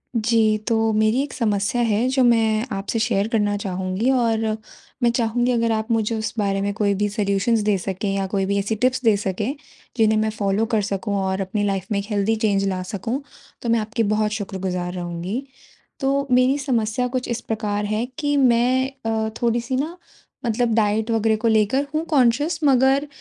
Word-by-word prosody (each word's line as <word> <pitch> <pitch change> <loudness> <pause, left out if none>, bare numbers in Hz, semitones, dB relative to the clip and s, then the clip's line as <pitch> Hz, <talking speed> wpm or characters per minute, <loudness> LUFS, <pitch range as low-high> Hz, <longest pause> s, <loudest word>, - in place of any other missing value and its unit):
जी। 220 -1 +3
तो 225 -1 +2
मेरी 215 +4 +2
एक 285 - -7
समस्या 210 0 0
है 230 +1 +1
जो 260 0 +2
मैं 225 -1 +3
आपसे 200 +4 -2
शेयर 205 -1 +1
करना 210 -3 +1
चाहूँगी। 190 +3 -2
और 230 -4 +2 0.6
मैं 240 - +5
चाहूँगी 240 +1 +1
अगर 230 -1 +1
आप 220 +1 -1
मुझे 225 0 +1
उस 220 0 -3
बारे 195 -1 0
में 200 0 -1
कोई 200 -1 +1
भी 205 +2 0
सॉल्यूशन्स 205 +2 +1
दे 200 - +3
सकें 190 +2 -3
या 195 0 -1
कोई 195 0 -1
भी 200 +1 0
ऐसी 200 +3 -1
टिप्स 255 +3 0
दे 220 -3 +5
सकें, 205 +6 -2 0.4
जिन्हें 220 -1 +3
मैं 220 0 +1
फॉलो 210 0 0
कर 215 - +2
सकूँ 200 +1 -2
और 190 0 -1
अपनी 200 +2 -2
लाइफ़ 195 -2 -1
में 200 - +1
एक 200 - -5
हेल्थी 210 +2 +1
चेंज 200 -3 +1
ला 185 -1 -2
सकूँ। 230 +6 -3 0.4
तो 235 - -3
मैं 230 0 +3
आपकी 225 +2 -1
बहुत 210 0 +1
शुक्रगुज़ार 190 -4 -3
रहूँगी। 175 +7 -4 0.6
तो 275 0 +1
मेरी 255 +3 +4
समस्या 250 -3 0
कुछ 250 0 -3
इस 235 0 -2
प्रकार 210 -2 -2
है 215 +3 -1
कि 290 -2 0
मैं 255 0 +3 0.2
अ, 220 -1 0
थोड़ी-सी 235 +2 0
ना 310 +6 -2 0.5
मतलब 235 0 +1
डाइट 220 +1 +1
वगैरह 225 -1 +2
को 230 - +3
लेकर 220 +6 +2
हूँ 310 +1 0
कॉन्शियस 290 +3 +2
मगर 270 +1 +4
220 Hz, 190 wpm, -22 LUFS, 205-240 Hz, 0.6 s, मैं